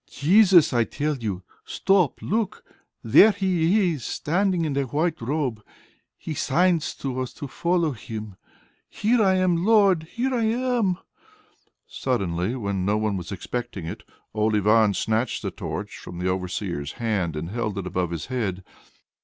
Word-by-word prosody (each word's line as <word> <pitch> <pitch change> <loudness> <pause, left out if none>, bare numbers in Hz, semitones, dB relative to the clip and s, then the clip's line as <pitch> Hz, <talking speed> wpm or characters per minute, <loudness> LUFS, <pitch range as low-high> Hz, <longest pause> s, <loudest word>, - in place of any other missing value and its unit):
"Jesus, 180 +1 +5
I 120 -1 +3
tell 150 +6 -2
you. 100 -6 -4 0.2
Stop! 195 -6 +1
Look! 215 -1 -2 0.4
There 215 - +7
He 185 -1 +2
is 140 -6 -7
standing, 180 +1 0
in 145 -3 -2
a 140 - +2
white 155 +4 -1
robe. 130 -3 -2 0.6
He 160 - -6
signs 165 +3 +1
to 130 -2 -4
us 130 - -4
to 145 - -7
follow 170 +3 0
Him.... 110 -4 -7 0.5
Here 230 +3 +1
I 190 -2 +4
am, 180 -2 +2
Lord! 195 -6 +4
Here 260 +2 -1
I 235 -3 +1
am!" 235 -5 +1 0.9
Suddenly, 100 -4 -2
when 100 -6 -2
no 100 +3 +1
one 105 -1 0
was 90 0 -6
expecting 100 -1 -5
it, 80 - -6 0.3
old 110 0 +1
Ivan 105 0 +4
snatched 110 +3 -1
the - - -2
torch - - -6
from 90 - -9
the 90 +1 -2
overseer's 90 -4 -3
hand, 100 -9 -1
and 80 +4 -5
held 110 -3 -3
it 100 - -3
above 90 -1 -1
his 85 -2 -4
head. 105 -8 -3
130 Hz, 155 wpm, -24 LUFS, -, 0.9 s, There